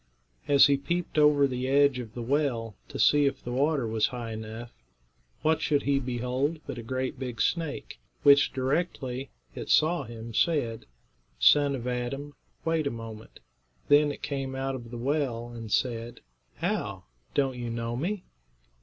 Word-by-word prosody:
As 140 Hz, -1 st, +7 dB
he 140 Hz, -1 st, +4 dB
peeped 160 Hz, +3 st, -1 dB
over 150 Hz, -1 st, +6 dB
the 130 Hz, -1 st, -2 dB
edge 140 Hz, -1 st, +4 dB
of 115 Hz, -3 st, -8 dB
the 120 Hz, -, -4 dB
well, 120 Hz, -5 st, 0 dB
to -, -, -7 dB
see 145 Hz, -1 st, +5 dB
if 140 Hz, -, -3 dB
the 120 Hz, -, -5 dB
water 140 Hz, +1 st, +1 dB
was 110 Hz, -1 st, +1 dB
high 120 Hz, -2 st, -5 dB
enough, 110 Hz, +2 st, -7 dB, 0.7 s
what 160 Hz, 0 st, +2 dB
should 145 Hz, -2 st, +1 dB
he 140 Hz, -1 st, +2 dB
behold 130 Hz, +4 st, -1 dB
but -, -, -5 dB
a -, -, -4 dB
great 130 Hz, +2 st, -3 dB
big 125 Hz, -4 st, -5 dB
snake, 165 Hz, +2 st, -1 dB, 0.2 s
which, 140 Hz, 0 st, +6 dB
directly 135 Hz, -2 st, -2 dB, 0.2 s
it -, -, -7 dB
saw 170 Hz, +3 st, +4 dB
him, 115 Hz, 0 st, -8 dB
said, 120 Hz, -5 st, 0 dB, 0.5 s
"Son 140 Hz, -, +5 dB
of 120 Hz, -2 st, -6 dB
Adam, 125 Hz, +4 st, -3 dB, 0.3 s
wait 160 Hz, -2 st, +1 dB
a -, -, +2 dB
moment." 115 Hz, -2 st, -9 dB, 0.5 s
Then 145 Hz, 0 st, +6 dB
it -, -, -9 dB
came 135 Hz, -2 st, -3 dB
out 135 Hz, 0 st, -2 dB
of 120 Hz, -3 st, -7 dB
the 120 Hz, -, -7 dB
well 125 Hz, -3 st, -1 dB
and 115 Hz, -2 st, -8 dB
said: 120 Hz, -2 st, -1 dB, 0.3 s
"How? -, -, -2 dB, 0.3 s
Don't 135 Hz, -2 st, +2 dB
you 120 Hz, -1 st, -3 dB
know 115 Hz, 0 st, -3 dB
me?" 180 Hz, +9 st, -2 dB
130 Hz, 165 wpm, -28 LUFS, 120-145 Hz, 0.7 s, As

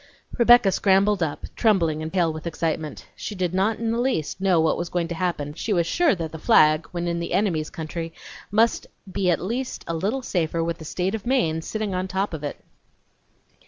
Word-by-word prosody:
Rebecca 240 Hz, -4 st, +6 dB
scrambled 195 Hz, +1 st, +3 dB
up, 155 Hz, -3 st, -2 dB
trembling 170 Hz, -9 st, +2 dB
and 160 Hz, 0 st, -4 dB
pale 175 Hz, -4 st, +1 dB
with 155 Hz, +1 st, -6 dB
excitement. 160 Hz, -2 st, -3 dB
She 210 Hz, -, -6 dB
did 180 Hz, -2 st, -1 dB
not 195 Hz, +4 st, +1 dB
in 230 Hz, -1 st, -1 dB
the 230 Hz, -, 0 dB
least 240 Hz, -, -1 dB
know 190 Hz, -3 st, +3 dB
what 160 Hz, 0 st, +3 dB
was 175 Hz, -1 st, -4 dB
going 175 Hz, -1 st, -1 dB
to -, -, -2 dB
happen, 170 Hz, -4 st, -2 dB
but 150 Hz, -, -12 dB
she 215 Hz, -, -1 dB
was 170 Hz, -3 st, +2 dB
sure 325 Hz, -, +2 dB
that 165 Hz, -3 st, -4 dB
the 160 Hz, -, -8 dB
flag, 155 Hz, +1 st, +4 dB
when 175 Hz, 0 st, -3 dB
in 170 Hz, 0 st, -1 dB
the 170 Hz, -, -4 dB
enemy's 175 Hz, -5 st, +1 dB
country, 165 Hz, +1 st, -5 dB, 0.4 s
must 225 Hz, +3 st, +2 dB, 0.2 s
be 185 Hz, 0 st, 0 dB
at 175 Hz, -, +2 dB
least 240 Hz, +8 st, -3 dB
a 170 Hz, -, -3 dB
little 210 Hz, +11 st, -1 dB
safer 165 Hz, -5 st, -1 dB
with 165 Hz, 0 st, -3 dB
the 160 Hz, -, -9 dB
State 185 Hz, +5 st, -2 dB
of 225 Hz, 0 st, -4 dB
Maine 165 Hz, -12 st, +1 dB
sitting 215 Hz, +3 st, -3 dB
on 185 Hz, +1 st, -1 dB
top 190 Hz, 0 st, -2 dB
of 155 Hz, -2 st, -5 dB
it! 145 Hz, -, -6 dB
180 Hz, 215 wpm, -24 LUFS, 160-205 Hz, 0.4 s, Rebecca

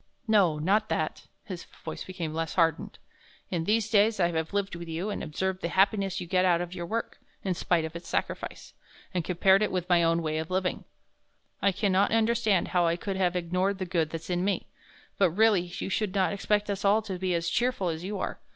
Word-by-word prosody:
"No, 195 Hz, -8 st, +4 dB
not 200 Hz, +8 st, +1 dB
that," -, -, -2 dB, 0.2 s
his 185 Hz, -4 st, -7 dB, 0.2 s
voice 160 Hz, -, -5 dB
becoming 170 Hz, -4 st, -5 dB
less 165 Hz, -1 st, -3 dB
hardened. 165 Hz, -2 st, +1 dB, 0.5 s
"In 170 Hz, -3 st, -1 dB
these 215 Hz, +2 st, +2 dB
days 215 Hz, 0 st, +3 dB
I 175 Hz, -2 st, +3 dB
have 160 Hz, -1 st, -2 dB
lived 200 Hz, -2 st, -1 dB
with 170 Hz, 0 st, -7 dB
you 170 Hz, +6 st, -3 dB
and -, -, -4 dB
observed 185 Hz, +4 st, -2 dB
the -, -, -1 dB
happiness 195 Hz, +1 st, +2 dB
you 180 Hz, -, -5 dB
get 185 Hz, +1 st, +2 dB
out 175 Hz, -2 st, +4 dB
of 175 Hz, 0 st, -4 dB
your 175 Hz, -2 st, -5 dB
work 225 Hz, +3 st, -3 dB, 0.2 s
in 190 Hz, -, 0 dB
spite 170 Hz, -1 st, +1 dB
of 160 Hz, +1 st, -7 dB
its 170 Hz, -, -8 dB
sacrefice -, -, -3 dB, 0.4 s
and 180 Hz, -2 st, 0 dB
compared 190 Hz, +3 st, +4 dB
it 215 Hz, -, +1 dB
with 180 Hz, -1 st, -2 dB
my 175 Hz, -1 st, +5 dB
own 165 Hz, 0 st, +2 dB
way 155 Hz, 0 st, -1 dB
of 160 Hz, +1 st, -4 dB
living, 185 Hz, 0 st, -1 dB, 0.8 s
I 200 Hz, -, +4 dB
can 200 Hz, +1 st, 0 dB
not 195 Hz, +2 st, +3 dB
understand 225 Hz, -4 st, +2 dB
how 175 Hz, -2 st, +2 dB
I 165 Hz, -, +2 dB
could 195 Hz, +3 st, -4 dB
have 185 Hz, -2 st, +1 dB
ignored 180 Hz, +3 st, 0 dB
the 190 Hz, -, -3 dB
good 170 Hz, -3 st, 0 dB
there's 165 Hz, +2 st, -6 dB
in 175 Hz, 0 st, 0 dB
me. 200 Hz, 0 st, 0 dB, 0.5 s
But, 190 Hz, -3 st, +5 dB
really, 210 Hz, +2 st, +4 dB, 0.2 s
you -, -, -3 dB
should 205 Hz, -1 st, -1 dB
not 190 Hz, 0 st, +2 dB
expect 205 Hz, +1 st, 0 dB
us 200 Hz, 0 st, -4 dB
all 210 Hz, +2 st, +4 dB
to 190 Hz, -4 st, -5 dB
be 185 Hz, -1 st, 0 dB
as 170 Hz, 0 st, -1 dB
cheerful 235 Hz, -1 st, 0 dB
as 160 Hz, +1 st, -4 dB
you 200 Hz, +2 st, -3 dB
are. -, -, -4 dB
185 Hz, 225 wpm, -28 LUFS, 170-200 Hz, 0.8 s, my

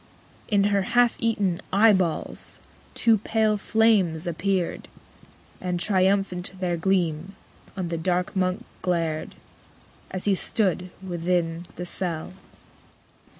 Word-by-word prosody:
In 205 Hz, -3 st, +3 dB
her 200 Hz, -, +3 dB, 0.2 s
half 245 Hz, -1 st, +5 dB
eaten 205 Hz, -6 st, 0 dB
eyeballs 195 Hz, -5 st, +2 dB, 0.4 s
two 225 Hz, -3 st, +4 dB
pale 220 Hz, 0 st, +1 dB
flames 205 Hz, -7 st, +2 dB
appeared, 180 Hz, +1 st, -1 dB, 0.7 s
And 180 Hz, -1 st, -2 dB
triumphant 190 Hz, -1 st, +1 dB
their 180 Hz, -2 st, 0 dB
gleam 175 Hz, 0 st, 0 dB, 0.4 s
on 180 Hz, -3 st, -2 dB
the 165 Hz, -1 st, -2 dB
dark 180 Hz, +2 st, 0 dB
Monk 185 Hz, +5 st, 0 dB, 0.2 s
glared, 165 Hz, -4 st, -1 dB, 0.7 s
As 185 Hz, -1 st, -4 dB
he 205 Hz, -, +4 dB
stood 185 Hz, -2 st, 0 dB, 0.2 s
within 170 Hz, -1 st, -1 dB
the 180 Hz, -, -5 dB
cell. 175 Hz, -2 st, -2 dB
185 Hz, 110 wpm, -25 LUFS, 175-200 Hz, 0.7 s, half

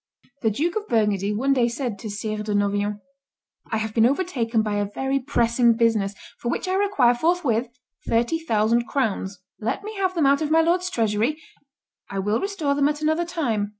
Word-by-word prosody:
The 220 Hz, -, +2 dB
Duke 310 Hz, -, -1 dB
of 425 Hz, 0 st, -4 dB
Burgundy 210 Hz, -3 st, +1 dB
one 260 Hz, +7 st, +1 dB
day 245 Hz, -3 st, +3 dB
said 235 Hz, -4 st, -3 dB
to 220 Hz, -, -6 dB
Sire 210 Hz, +1 st, -3 dB
de 210 Hz, -1 st, -2 dB
Noviant, 205 Hz, 0 st, 0 dB, 0.7 s
"I 220 Hz, -, +1 dB
have 220 Hz, 0 st, -3 dB
been 225 Hz, +1 st, +5 dB
overtaken 250 Hz, -8 st, 0 dB
by 210 Hz, -1 st, -1 dB
a 205 Hz, -1 st, -1 dB
very 270 Hz, +1 st, 0 dB
pressing 240 Hz, -3 st, +2 dB
business, 220 Hz, -4 st, +1 dB, 0.2 s
for 240 Hz, -, -3 dB
which 370 Hz, -, -2 dB
I 370 Hz, -, 0 dB
require 380 Hz, -12 st, +3 dB
forthwith 255 Hz, -4 st, +1 dB, 0.4 s
thirty 235 Hz, +8 st, +1 dB
thousand 235 Hz, -5 st, +1 dB
crowns; 200 Hz, -7 st, -2 dB, 0.2 s
let 230 Hz, -, -2 dB
me 425 Hz, +1 st, -6 dB
have 375 Hz, -1 st, 0 dB
them 320 Hz, -4 st, +2 dB
out 280 Hz, +2 st, +4 dB
of 305 Hz, -, -1 dB
my 325 Hz, +1 st, +5 dB
lord's 355 Hz, +2 st, +1 dB
treasury; 230 Hz, -, 0 dB, 0.7 s
I 195 Hz, -, -5 dB
will 205 Hz, +3 st, 0 dB
restore 385 Hz, -8 st, -1 dB
them 285 Hz, 0 st, +2 dB
at 300 Hz, +1 st, -4 dB
another 315 Hz, +3 st, +1 dB
time." 240 Hz, -, -1 dB
235 Hz, 190 wpm, -23 LUFS, 215-310 Hz, 0.7 s, been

